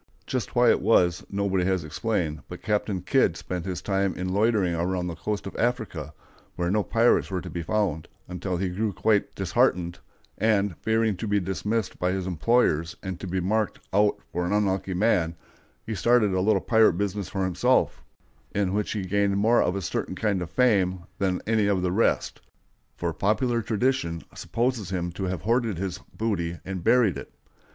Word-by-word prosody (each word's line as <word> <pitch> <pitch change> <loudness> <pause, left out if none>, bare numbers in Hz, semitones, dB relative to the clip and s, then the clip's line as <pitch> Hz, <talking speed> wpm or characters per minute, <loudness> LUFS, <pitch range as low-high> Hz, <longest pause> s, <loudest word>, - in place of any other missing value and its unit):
Just - - -3
why - - +6
it - - +1
was, 90 0 +3
nobody 100 -2 0
has 95 -3 +1
explained, 80 -1 -2
but - - -9
Captain 105 -3 -1
Kidd - - +2
spent 90 -1 -5
his 90 -1 -4
time 95 -2 0
in 90 0 -3
loitering 105 -4 +2
around 90 +2 -1
the 90 - -3
coast 105 +4 -3
of 95 - -7
Africa, 110 - -2 0.4
where 90 0 -1
no 105 +1 +2
pirates 115 +3 +2
were 95 -1 -2
to - - -8
be 85 - -3
found, 85 -3 -1 0.2
until 90 0 -3
he 95 +1 -1
grew 100 +3 -1
quite 105 +5 +1
disheartened, 90 -3 +1 0.4
and, 105 -4 +2
fearing 110 -1 +1
to 110 - -4
be 105 0 +2
dismissed 100 +3 -2
by 90 0 +1
his 95 -1 -2
employers 85 -2 +1
and 95 -3 -5
to 95 - -6
be 95 +1 -1
"mark'd 105 +4 0 0.2
out 105 +1 +3
for 90 - -1
an 90 +3 -1
unlucky 95 -2 0
man," 90 -5 +2 0.5
he 110 - -3
started 110 -1 +3
a 95 - +1
little 100 0 +3
pirate 110 -4 +4
business 100 +1 -2
for 95 - -2
himself, 90 -2 +1 0.5
in 100 -2 +1
which 105 0 -1
he 100 -4 -3
gained 100 +1 +1
more 115 +4 +4
of 90 - +1
a 100 - -3
certain 95 - -3
kind 100 -2 0
of 85 - -4
fame 95 -6 +2 0.2
than 95 -2 0
any 110 -2 +2
of 95 -3 +1
the 90 - +1
rest; 110 +5 +1 0.6
for 85 -1 -2
popular 115 - +1
tradition 110 -6 -1
supposes 120 -5 -2
him 90 -2 -2
to 95 +3 -4
have 90 -4 -3
hoarded 115 -2 +1
his 90 -1 -3 0.2
booty 85 -7 -1
and 95 -2 -5
buried 110 - +4
it. - - -11
95 Hz, 185 wpm, -26 LUFS, 90-110 Hz, 0.6 s, why